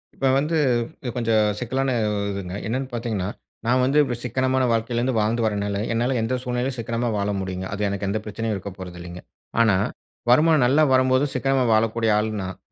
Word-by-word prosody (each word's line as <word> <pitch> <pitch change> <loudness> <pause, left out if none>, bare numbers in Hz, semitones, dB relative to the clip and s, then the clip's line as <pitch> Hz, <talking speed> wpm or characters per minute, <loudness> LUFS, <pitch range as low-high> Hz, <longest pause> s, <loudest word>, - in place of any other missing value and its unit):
இப்ப 135 - +1
வந்து 155 +4 +1 0.6
கொஞ்சம் 115 -3 +2
சிக்கலான 130 +2 -1 0.4
இதுங்க. 95 -1 -5
என்னன்னு 130 +3 -2
பார்த்தீங்கன்னா, 115 -6 -2 0.4
நான் 125 +2 +3
வந்து 135 +3 +2
இப்படி 125 -4 -3
சிக்கனமான 130 +2 +1
வாழ்க்கையில 115 +1 0
இருந்து 125 +1 0
வாழ்ந்து 110 +3 +1
வரனால, 100 -1 -1 0.2
என்னால 120 +3 +1
எந்த 120 +3 0
சூழ்நிலையிலும் 125 +1 -2
சிக்கனமா 115 +1 -1
வாழ 100 0 -1
முடியுங்க. 95 0 -4
அது 105 +1 -1
எனக்கு 100 0 -3
எந்த 110 +2 0
பிரச்சனையும் 110 +1 -3
இருக்க 100 +1 -6
போறதில்லேங்க. 90 -1 -8 0.4
ஆனா 110 -4 +4 0.5
வருமானம் 150 +3 +5
நல்லா 140 +5 +4
வரும்போது 130 +1 +3
சிக்கனமா 135 +1 +1
வாழக்கூடிய 110 +1 +2
ஆள் 105 - +1
நான். 95 0 -5
115 Hz, 165 wpm, -23 LUFS, 105-130 Hz, 0.6 s, வருமானம்